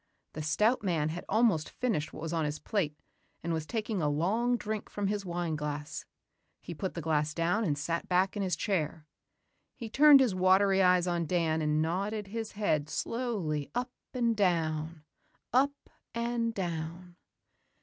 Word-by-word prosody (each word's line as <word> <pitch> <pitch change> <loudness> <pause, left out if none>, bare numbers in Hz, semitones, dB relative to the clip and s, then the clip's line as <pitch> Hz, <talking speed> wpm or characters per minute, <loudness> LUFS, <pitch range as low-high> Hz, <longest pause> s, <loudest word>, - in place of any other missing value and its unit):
The 155 - -5
stout 210 +11 +2
man 165 -6 0
had 170 +3 -5
almost 210 -8 +3
finished 205 -12 -1
what 155 - -8
was 165 0 -3
on 165 -1 +1
his 150 0 -2
plate 155 -8 -2 0.5
and 170 0 -1
was 160 -1 -3
taking 215 -3 -2
a 150 - +2
long 215 +11 +1
drink 215 -2 -4
from 205 - -3
his 200 -1 -1
wine 170 -2 -2
glass. 150 0 -4 0.5
He 175 - -7
put 185 +4 -4
the 170 - -4
glass 155 -1 0
down 175 +6 +1
and 150 -8 0
sat 165 +3 -2
back 185 +2 +2
in 205 - -2
his 185 -2 0
chair. 160 -5 -2 0.7
He 230 -3 -7
turned 290 +1 +8
his 255 -7 +3
watery 190 +1 +4
eyes 180 -1 +4
on 170 -2 -1
Dan 160 -2 +1
and 150 0 +2
nodded 200 +6 -2
his 225 +1 -4
head 155 -8 0
slowly 190 - -2
up 245 +1 -1 0.2
and 235 -3 +1
down... 160 -5 0 0.5
up 280 +3 +3 0.4
and 235 0 0
down. 175 -2 -5
180 Hz, 170 wpm, -30 LUFS, 155-215 Hz, 0.7 s, turned